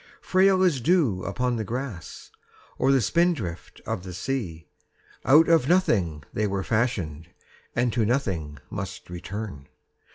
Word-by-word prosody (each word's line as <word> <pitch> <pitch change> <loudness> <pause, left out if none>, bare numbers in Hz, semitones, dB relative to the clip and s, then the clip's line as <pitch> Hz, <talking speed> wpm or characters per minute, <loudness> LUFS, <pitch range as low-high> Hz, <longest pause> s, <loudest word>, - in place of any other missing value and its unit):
Frail 190 0 +3
as 160 -9 +2
dew 140 - +2
upon 125 +4 -1
the 110 - -2
grass 115 -5 -6 0.5
Or 135 - +4
the 135 -2 +4
spindrift 120 - 0
of 110 -4 -2
the 90 -1 -8
sea, 95 - -3 0.6
Out 150 +6 +7
of 165 -5 +4
nothing 95 - +2
they 105 0 0
were 100 -1 -2
fashioned 95 -10 -1 0.5
And 120 -1 +1
to 115 - +2
nothing 95 - -1
must - - -6
return. 90 -5 -6
110 Hz, 135 wpm, -26 LUFS, 90-135 Hz, 0.6 s, Out